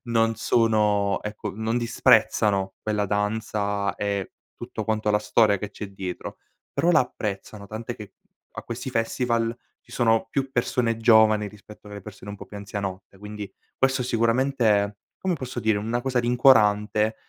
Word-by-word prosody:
non 115 -1 +2
sono 105 -3 +2
ecco 105 -1 -5
non 110 +2 -1
disprezzano 100 -4 +3
quella 105 -1 0
danza, 105 -1 -1
e 100 -2 -3 0.2
tutto - - -6
quanto 110 -1 0
la 105 - +3
storia 105 -2 +3
che 105 +1 -5
c'è 105 +1 -7
dietro, 95 -2 -6 0.3
però 175 - +2
la 155 - +6
apprezzano, 105 -4 -5
tant'è 115 +3 -6
che 105 -2 -11 0.4
a - - -7
questi 120 +3 -6
festival, 115 -1 0 0.3
ci - - -16
sono 115 -2 +2
più 135 -1 -1
persone 120 -2 0
giovani, 110 -2 +5
rispetto 105 +1 -14
alle 105 0 -8
persone 100 0 -10
un 100 - -7
po' - - -10
più 105 - -10
anzianotte, 100 -1 -6
quindi 105 -1 -8 0.3
questo 130 0 +2
è - - -4
sicuramente, 115 -4 +2 0.2
come 185 -2 0
posso 130 -4 -5
dire, 110 -2 +2
una 115 +3 -2
cosa 130 0 -1
rincuorante, 110 -3 +4
110 Hz, 155 wpm, -25 LUFS, 105-115 Hz, 0.4 s, la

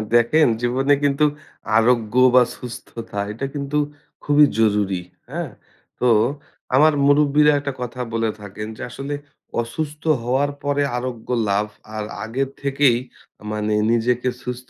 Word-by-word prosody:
দেখেন 135 +6 +5
জীবনে 130 +4 +2
কিন্তু 145 +1 +3 0.5
আরোগ্য 115 -1 +2 0.2
বা 125 - +8
সুস্থতা 115 -3 -8
এটা 115 +6 -4
কিন্তু 140 +1 -2 0.5
খুবই 145 0 +6
জরুরি, 100 -4 +2 0.3
হ্যাঁ? 160 -1 -4 0.5
তো 125 - +2 0.7
আমার 155 +3 +6
মুরুব্বিরা 150 +1 +5
একটা 140 -1 -4
কথা 125 +1 -4
বলে 115 -1 +1
থাকেন 105 +1 -7
যে, - - -9
"আসলে 140 +3 -5 0.5
অসুস্থ 150 +6 -5 0.2
হওয়ার 135 +4 +1
পরে 145 0 +1
আরোগ্য 120 -2 -5 0.2
লাভ 100 +2 +1 0.3
আর 110 - -2 0.2
আগের 130 +5 -2
থেকেই 140 -3 +3 0.4
আ - - -15
মানে 105 0 -1 0.2
নিজেকে 120 +2 +1
সুস্থ 125 0 -6
125 Hz, 130 wpm, -21 LUFS, 115-145 Hz, 0.7 s, বা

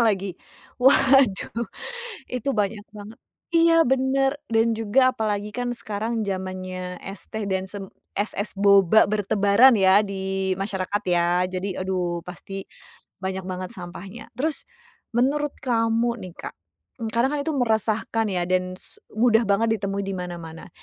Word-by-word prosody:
lagi. 200 -5 +1 0.5
Waduh, 260 -4 +4 0.7
itu 250 +2 -2
banyak 205 0 -1
banget 210 +4 -10 0.4
iya, 330 -3 +5
benar, 265 +1 +2 0.2
dan 225 0 +3
juga 255 +4 +3
apalagi 210 -1 -1
kan 245 0 -2
sekarang 220 -1 -3
zamannya 185 -1 -4
es 195 +1 -7
teh 220 -2 -3
dan 190 -1 0
sem 195 -2 -7 0.2
es-es 205 0 -2
boba 200 0 +5
bertebaran 210 +3 +4
ya, 190 +2 +6
di 190 -1 -2
masyarakat 195 +1 -2
ya. 175 0 +2
Jadi 185 +1 -4
aduh, 180 -2 -1
pasti, 195 +2 -7 0.5
banyak 190 0 -3
banget 185 0 -5
sampahnya, 190 +4 -9
terus, 300 +1 -1 0.5
menurut 280 +5 +1
kamu 230 -1 +1
nih 180 -2 -8
Kak, - - -7 0.6
karena 235 +3 +2
kan 295 - -1
itu 320 - -1
meresahkan 225 -1 +1
ya 180 -1 0
dan 185 0 0
su - - -11 0.2
mudah 230 0 +4
banget 200 +3 +3
ditemui 200 0 -2
di 195 - -3
mana-mana. 170 -3 -7
205 Hz, 135 wpm, -24 LUFS, 190-235 Hz, 0.7 s, ya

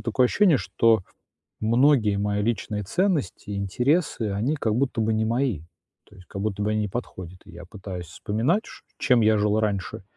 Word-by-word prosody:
такое 120 +2 +1
ощущение, 175 +3 +4
что 115 -4 +2 0.6
многие 115 -2 +3
мои 105 0 -1
личные 105 -2 -2
ценности, 150 - -1
интересы, 110 - 0
они 115 +10 -1
как 110 -7 -1
будто 125 -2 -1
бы 110 0 +1
не 110 - +1
мои, 115 - 0 0.4
то - - -21
есть 90 -2 -16
как 100 - -6
будто 105 -1 -2
бы 105 +1 0
они 110 0 0
не 105 - -1
подходят. 95 -5 -7
И - - -14
я - - -10
пытаюсь 95 -2 -8
вспоминать, 115 - -1
ш - - -13
чем 125 -4 +3
я 110 0 +4
жил 105 +1 +1
раньше, 100 -4 -2
110 Hz, 185 wpm, -24 LUFS, 100-125 Hz, 0.6 s, ощущение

